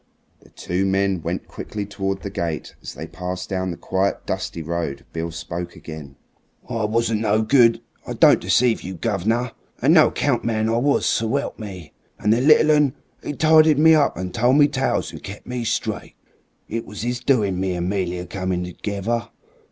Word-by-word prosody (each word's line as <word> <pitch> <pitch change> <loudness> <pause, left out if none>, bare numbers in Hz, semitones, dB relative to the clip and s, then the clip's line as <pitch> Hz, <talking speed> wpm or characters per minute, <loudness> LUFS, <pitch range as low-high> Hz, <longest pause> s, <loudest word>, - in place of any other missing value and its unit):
The - - -21
two 90 +2 -2
men 95 -2 +1
went 85 +3 -4
quickly 105 -1 -6
towards 95 -1 -3
the 100 - -5
gate. 85 -5 -4
As - - -8
they 80 - -6
passed 90 +2 -6
down 95 -1 -2
the 85 - -5
quiet, 95 +1 -1
dusty 85 - -3
road 80 -3 -3
Beale 85 0 -3
spoke 85 +2 -6
again. 75 -4 -9 0.5
"I 115 -4 -1
wasn't 115 0 0
no 110 0 +2
good 115 -2 +4 0.3
I - - -3
don't - - +5
deceive 120 -2 +2
you, 95 +1 -6
guv'ner 115 +8 -1 0.3
a - - -1
no - - +7
account - - 0
man 110 -1 0
I 115 - +1
was, 140 +4 +2
swelp 120 +6 0
me! 95 -8 -8 0.2
And 105 - +2
the 120 - +1
little 155 +2 +6
'un, 150 -3 +3 0.3
'e - - -3
tidied 155 0 +5
me 160 +2 +6
up 150 - +3
and 90 0 -4
told 120 +3 +3
me 145 -1 +6
tales 135 -2 -1
and - - -10
kep' 100 +1 -9
me 125 -1 -4
straight. 115 - -3 0.5
It 115 +1 -4
was 105 +2 -6
'is 120 0 -1
doing 105 -8 +1
me 95 -1 -1
and 90 0 -2
'Melia 90 -2 -2
come 95 -1 -2
together. 100 +6 -3
100 Hz, 185 wpm, -22 LUFS, 90-120 Hz, 0.5 s, no